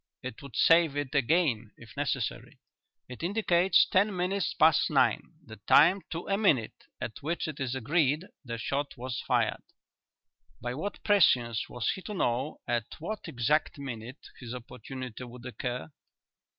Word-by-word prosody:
"It 125 -3 -7
would 140 -4 -11
save 165 -3 +5
it 145 -2 -3
again 135 -6 +1
if 110 -5 -14
necessary. - - -3 0.5
It 125 - -9
indicates 180 -1 +3
ten 200 +2 +2
minutes 185 +2 -1
past 160 -1 +4
nine - - +1
the - - -11
time 180 +6 +6
to 165 +1 -5
a 195 +1 +1
minute 135 - +1
at 110 - -6
which 160 +4 -2
it 155 -3 -6
is 130 -1 -2
agreed 145 +5 +1 0.2
the 120 -3 -5
shot 140 +4 -3
was 125 -1 -4
fired. - - +1 1.0
By 120 +1 -4
what 190 +10 -5
prescience 125 - +3
was 120 -2 -1
he 190 - -6
to 210 +2 -6
know 130 -2 -1
at 120 -2 0
what 210 +7 -5
exact 140 +7 0
minute 130 -1 -8
his 125 -1 -7
opportunity 125 0 -8
would 120 0 -11
occur?" 125 +3 -5
140 Hz, 150 wpm, -29 LUFS, 120-170 Hz, 1.0 s, time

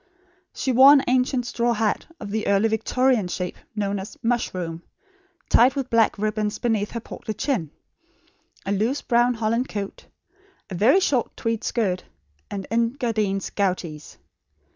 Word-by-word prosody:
She 265 - -2
wore 265 +3 +8
an 275 -2 +5
ancient 250 0 +1
straw 240 0 0
hat, 220 -2 -1
of 205 -2 -7
the 215 0 -2
early 200 +2 +3
Victorian 225 0 +1
shape 180 0 -4 0.2
known 200 -1 -1
as 190 +3 -9
"mushroom," 185 -8 -2 0.7
tied 255 +4 +5
with 270 -2 -3
black 230 -2 +3
ribbons 215 0 -1
beneath 220 -4 0
her 235 - -5
portly 215 -1 -7
chin; 215 - -1 1.0
a 195 - -2
loose 220 +8 0
brown 240 0 +2
holland 230 +3 -1
coat; 200 -2 -6 0.6
a - - -3
very 235 - +4
short 260 -9 0
tweed 230 -1 -2
skirt, 190 -6 -1 0.5
and 195 -1 -5
Engadine 230 -4 0
"gouties." 180 -6 -2
225 Hz, 140 wpm, -23 LUFS, 200-245 Hz, 1.0 s, wore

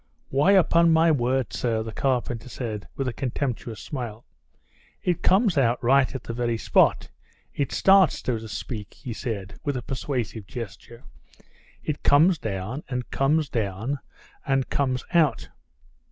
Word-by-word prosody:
"Why, 145 +9 +4
upon 170 -3 +5
my 165 +1 +5
word, 130 -3 0
sir," 115 -2 0
the 110 - -6
carpenter 125 0 -1
said 110 -5 -5
with 135 - -2
a 125 - -2
contemptuous 120 -4 -3
smile. 120 -5 -6 0.8
"It 175 -1 0
comes 190 - +3
out 120 -2 +3
right 135 +2 +3
at 130 - -5
the 115 - -5
very 120 -1 -1
spot. - - +3 0.4
It 140 - -2
starts, 190 -4 +5
so 120 -3 -1
to 110 - -8
speak," 105 0 -6
he 120 - -7
said, 100 -5 -5
with 145 -2 -1
a 125 - -5
persuasive 120 -6 -4
gesture; 115 +1 -8 0.8
"it 150 -2 -3
comes 160 +4 +5
down, 110 +7 -4
and 125 -2 -4
comes 150 +3 +2
down, 115 +4 -2 0.4
and 135 -1 0
comes 130 -2 0
out." 165 -4 +2
125 Hz, 150 wpm, -25 LUFS, 115-145 Hz, 0.8 s, upon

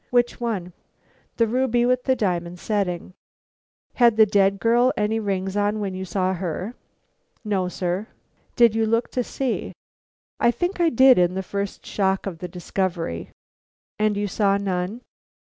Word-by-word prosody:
"Which 240 0 +1
one?" 195 -7 -3 0.6
"The 230 - +4
ruby 240 +1 +1
with 250 0 +1
the 260 - +3
diamond 180 -5 -2
setting." 185 -4 -2 0.8
"Had 235 -3 +4
the 220 - +8
dead 200 -1 +2
girl 240 +3 +3
any 215 +1 +1
rings 195 -2 -2
on 205 +1 +1
when 200 -2 -3
you 190 0 -5
saw 185 +1 0
her?" 185 +4 -4 0.7
"No, 195 -3 0
sir." 180 +3 -3 0.5
"Did 235 -2 +5
you 225 0 +1
look 230 +2 0
to 250 - -1
see?" 260 0 -3 0.7
"I - - +4
think 350 +9 -1
I 335 - +4
did 260 -4 +6
in 180 0 +2
the 190 - -2
first 200 +1 -4
shock 190 -1 0
of 180 -5 -5
the 180 - -5
discovery." 175 - -3 0.7
"And 210 -1 +1
you 205 0 -1
saw 200 0 +2
none?" 195 +3 -3
205 Hz, 160 wpm, -23 LUFS, 185-235 Hz, 0.8 s, the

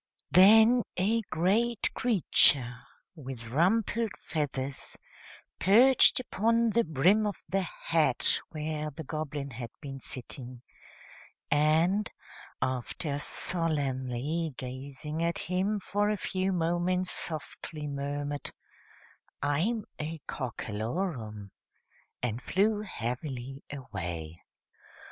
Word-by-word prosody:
Then 220 +6 +8 0.2
a 215 +5 +2
great 210 +8 +1
creature, 145 - +3 0.4
with 130 -8 -8
rumpled 205 - +1
feathers, 140 -3 -3 0.6
perched 250 +9 +6
upon 230 -1 +2
the 235 +2 +3
brim 180 +8 +3
of 205 - -2
the 195 +1 +1
hat 165 -6 +2
where 155 -1 -3
the 160 +2 -8
Goblin 145 -2 -4
had 120 0 -6
been 135 -3 -7
sitting, 125 -1 -6 0.9
and, 160 +8 +3 0.5
after 130 +3 -2
solemnly 145 -1 -1
gazing 135 +4 -5
at 170 0 0
him 190 +4 0
for 205 +2 0
a 210 - 0
few 190 0 -1
moments, 175 +1 +1
softly 155 -1 -3
murmured, 145 0 -3 0.9
"I'm 185 +11 +1
a 160 +2 -3
Cockalorum," 110 - -4 0.7
and 120 0 -1
flew 205 +6 +2
heavily 130 - -5
away. 85 - -6
155 Hz, 95 wpm, -30 LUFS, 130-190 Hz, 0.9 s, Then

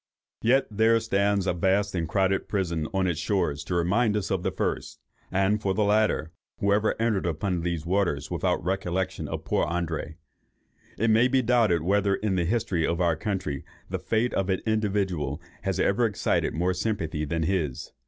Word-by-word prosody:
Yet 130 +4 +3
there 110 +2 +4
stands 100 -3 +1
a 95 - +1
vast 95 +3 +1
and 85 -4 -2
crowded 95 +3 +1
prison 85 -6 -1
on 95 -1 +1
its 85 -4 0
shores 85 -8 0
to 90 - -2
remind 105 +6 +2
us 100 - -3
of 95 -2 0
the - - 0
first—and 95 +3 -2
for 95 -2 0
the 110 - +2
latter, 105 -6 +2 0.3
who 100 0 +2
ever 105 +2 +1
entered 110 -6 +1
upon 85 +2 -1
these 85 -2 -2
waters 90 -5 0
without - - 0
a - - -14
recollection 95 0 -2
of - - -5
poor - - +1
André? 80 -2 -3 0.8
It 115 +1 +2
may 115 +3 +5
be 130 0 +2
doubted 110 -9 +3
whether 100 +2 +2
in 105 -1 -1
the 90 -2 +1
history 95 -4 0
of 85 +2 0
our 85 -2 +2
country 80 -6 -3 0.3
the - - -1
fate 115 +2 0
of 95 0 0
an 95 - 0
individual 95 -9 0 0.2
has 95 -1 -2
ever 115 +4 +3
excited 105 - 0
more 90 +3 +1
sympathy 85 -8 -2
than 80 +2 -1
his. 80 -7 -2
95 Hz, 185 wpm, -26 LUFS, 85-105 Hz, 0.8 s, may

